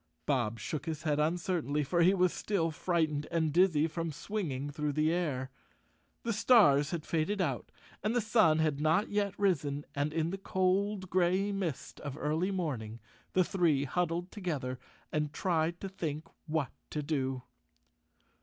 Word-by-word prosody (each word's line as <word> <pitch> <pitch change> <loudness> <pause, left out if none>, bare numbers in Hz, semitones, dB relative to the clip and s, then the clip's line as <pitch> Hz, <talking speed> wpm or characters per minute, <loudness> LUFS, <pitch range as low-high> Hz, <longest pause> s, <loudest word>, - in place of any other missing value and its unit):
Bob 115 -4 0
shook 130 +9 -4
his 160 -1 -3
head 150 -2 +1
uncertainly, 160 -2 0
for 170 +5 +1
he 185 +3 +5
was 180 -2 +3
still 170 -6 0
frightened 155 -3 0
and 160 -3 0
dizzy 170 -3 +4
from 165 0 -3
swinging 150 -4 -3
through 150 0 -1
the 155 +2 +2
air. 135 -7 -1 0.7
The 230 - 0
stars 205 - +5
had 165 -2 -4
faded 165 +6 0
out 185 - -1 0.3
and 215 +3 0
the - - +4
sun 215 -8 +4
had 155 -3 +1
not 160 +8 +2
yet 205 -1 0
risen 145 -8 0
and 145 +2 -1
in 165 +1 0
the 195 - -4
cold 190 +1 0
gray 185 +3 +2
mist 185 -8 -4
of 145 -1 -6
early 155 +5 0
morning 130 - -3 0.3
the 185 - +4
three 165 -7 +2
huddled 175 +4 -1
together 145 - -3 0.3
and 150 -1 -1
tried 170 0 0
to 195 - -4
think 160 -5 -4 0.2
what 155 -3 -1 0.2
to 150 - -3
do. 135 -4 -1
160 Hz, 160 wpm, -32 LUFS, 145-185 Hz, 0.7 s, he